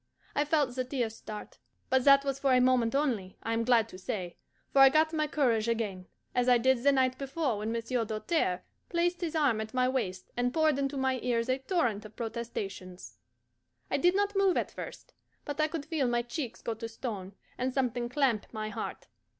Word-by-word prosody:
I 290 - +2
felt 295 -4 +2
the 255 - 0
tears 245 -4 -2
start. 210 -1 -9 0.3
But 260 -1 +3
that 275 0 +7
was 275 -1 -1
for 275 -1 +3
a - - +5
moment 250 -2 +3
only, 235 -10 -1
I 225 - -1
am 230 0 +1
glad 230 -2 +4
to 185 - -10
say, 185 -2 -4 0.4
for 275 - +4
I 270 0 +10
got 315 +3 +3
my 305 -1 +1
courage 240 -7 +1
again, 205 -6 -2 0.3
as 250 0 +2
I 245 - +7
did 260 +1 +2
the 280 +2 +5
night 260 -1 +2
before 275 -4 -1
when 215 +2 -2
Monsieur 230 +1 -1
Doltaire 215 - -1 0.3
placed 345 +1 0
his 335 -2 -2
arm 275 -8 +2
at 220 +3 -7
my 255 0 +3
waist, 205 -9 -2
and 245 0 +1
poured 310 -3 +3
into 275 0 -1
my 265 -1 +1
ears 235 0 0
a 255 +1 +1
torrent 260 - 0
of 215 0 -12
protestations. 210 -6 -6 0.7
I - - +2
did 355 +1 +3
not 405 0 +1
move 390 -2 +3
at - - -1
first. - - -9 0.3
But 290 +1 -2
I 310 - +3
could 310 -2 -5
feel 300 -6 0
my 240 0 +1
cheeks 240 0 -5
go 230 - -1
to 225 +1 -6
stone, 205 -5 -6 0.2
and 255 +1 0
something 245 -2 -1
clamp 250 -6 +1
my 215 -1 -4
heart. 210 - -5
250 Hz, 205 wpm, -30 LUFS, 225-280 Hz, 0.7 s, I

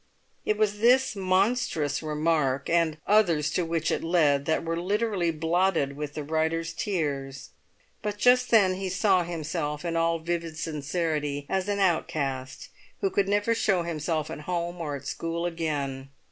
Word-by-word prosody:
It 210 - +1
was 210 -1 +1
this 250 +2 +4
monstrous 185 - +1
remark, 150 -3 0
and 165 -2 +2
others 170 -8 +3
to 180 - 0
which 165 -1 -1
it - - -1
led, 150 -5 +2
that 160 +2 0
were 165 +1 -2
literally 200 -2 0
blotted 165 -2 +1
with 145 0 -5
the 150 - -3
writer's 160 +2 -1
tears. 140 - -3 0.5
But 210 -1 -3
just 250 +3 +4
then 200 -5 +5
he 190 -1 -3
saw 185 0 +3
himself 155 -2 -3
in 170 -1 -2
all 165 0 +2
vivid 165 -1 -3
sincerity 150 -2 -2
as 190 +1 -1
an 205 - 0
outcast 155 -8 -1 0.3
who 195 - +1
could 200 -1 +1
never 205 +3 +2
show 195 -6 +1
himself 160 -1 -2
at - - -6
home 175 0 -2
or 150 -3 -3
at 140 0 -9
school 165 +4 -3
again. 145 -6 -3
165 Hz, 160 wpm, -27 LUFS, 150-190 Hz, 0.5 s, then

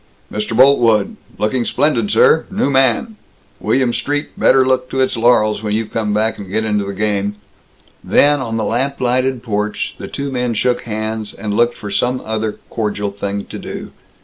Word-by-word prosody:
"Mr. 105 +1 -2
Boltwood! 120 -6 +4 0.2
Looking 120 +4 0
splendid, 120 -6 +1
sir! 160 - +4
New 195 -7 0
man! 135 - +2 0.4
William 130 -2 +1
Street 145 +3 -1
better 130 -1 +4
look 130 -1 +1
to 135 - -3
its 130 0 +2
laurels 110 -3 +3
when 105 -1 -1
you 110 +1 0
come 105 0 -2
back 110 +2 0
and 100 -2 -8
get 110 +2 0
into 105 -2 0
the 100 - -4
game!" 105 0 -1 0.7
Then, 145 0 +4
on 115 -3 -3
the 110 - -1
lamp 135 +5 -1
lighted 130 0 0
porch, 105 -2 -2
the - - -6
two 140 0 -4
men 125 -2 -1
shook 125 +3 +1
hands, 110 -1 -4
and 105 0 -4
looked 120 +1 +2
for 100 - -7
some 125 +5 0
other 110 -1 -2 0.2
cordial 105 -2 -2
thing 100 0 -4
to - - -8
do. - - -7
115 Hz, 180 wpm, -17 LUFS, 105-130 Hz, 0.7 s, Boltwood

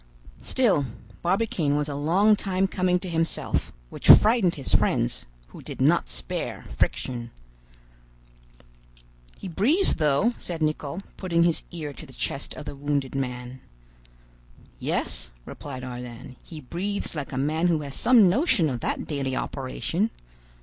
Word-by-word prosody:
Still, 200 - +2 0.3
Barbicane 175 -5 +1
was 150 0 0
a 145 - -4
long 180 +9 +4
time 195 -2 0
coming 185 -1 +1
to 190 - -5
himself, 165 -1 -1 0.2
which - - -3
frightened 210 -5 +7
his 140 - -4
friends, - - +1 0.2
who - - -11
did - - -8
not - - +3
spare - - -4
friction. 120 - -1 2.1
"He - - -7
breathes 260 - +4
though," 155 - +2
said 165 -3 -4
Nicholl, 155 +2 -2 0.2
putting 170 -3 +1
his 170 -2 +2
ear 155 -4 -6
to - - -11
the 130 - -14
chest 135 - -4
of 150 - -8
the 145 - -5
wounded 140 -1 -1
man. 125 -1 -4 1.2
"Yes," - - -1 0.2
replied 130 -3 -8
Ardan, 125 +1 -8
"he 160 - -9
breathes 190 +9 -3
like 150 -4 -5
a 130 - -4
man 155 +5 +1
who 165 -3 +2
has 140 -2 -7
some 235 - +5
notion 210 - +3
of 125 - -3
that - - -2
daily 135 -3 -2
operation. 165 - -2
155 Hz, 145 wpm, -25 LUFS, 135-185 Hz, 2.1 s, frightened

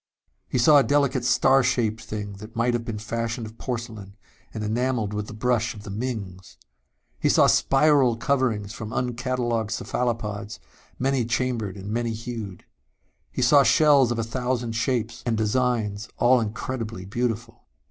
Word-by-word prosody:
He - - -1
saw 145 +5 +6
a - - +4
delicate 140 -3 +1
star 130 +2 +4
shaped 120 -4 0
thing 105 -1 -5
that 110 +3 -11
might 120 +1 +1
have 120 -1 -1
been 115 -2 -5
fashioned 115 +1 -3
of 110 +1 -12
porcelain 115 -5 -6 0.4
and 110 - -5
enameled 115 -1 -1
with 105 0 -3
the - - -8
brush 120 0 0
of 105 - -11
the 105 - -7
Mings. 100 -5 -5 0.6
He - - +2
saw - - +5
spiral 135 -4 +4
coverings 115 -4 0
from 110 -3 -6
uncatalogued 120 -2 -1
cephalopods, 110 -2 -3 0.4
many 135 -1 +1
chambered 115 -4 -2
and 100 +2 -7
many 115 0 -1
hued. 110 -5 -7 0.7
He 130 - -1
saw 140 +3 +6
shells 140 0 +5
of 120 - -1
a 115 - 0
thousand 125 0 -2
shapes 115 0 -1
and 115 -2 0
designs, 110 -2 0
all 125 0 +4
incredibly 115 -2 -4
beautiful.... 115 +2 -3
115 Hz, 155 wpm, -25 LUFS, 110-125 Hz, 0.7 s, saw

